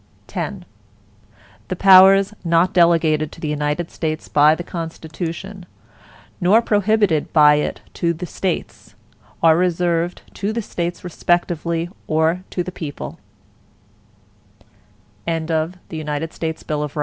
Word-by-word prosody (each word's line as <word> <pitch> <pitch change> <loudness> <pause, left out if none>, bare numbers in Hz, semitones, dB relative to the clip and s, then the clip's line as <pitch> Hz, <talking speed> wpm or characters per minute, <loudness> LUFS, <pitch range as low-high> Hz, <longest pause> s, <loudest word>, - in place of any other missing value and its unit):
X - - -4 1.0
The 185 - -3
powers 195 +2 +7
not 170 +1 +2
delegated 165 -3 +3
to - - -13
the 155 - -4
United 150 +3 -2
States 155 -1 -4
by 150 +1 +5
the 175 - -6
Constitution, 170 +3 -6 0.7
nor 190 +6 +5
prohibited 205 -7 +1
by 150 -2 +7
it 150 - -3 0.2
to 170 - +2
the 170 +2 -5
States, 180 0 -4 0.5
are 160 -1 +6
reserved 175 0 0
to 205 +1 -2
the 230 0 -3
States 175 -2 -4
respectively, 170 -1 -1 0.2
or 160 +3 +1
to 180 - -2
the 185 - -6
people. 155 -5 -7
170 Hz, 100 wpm, -20 LUFS, 160-185 Hz, 1.0 s, powers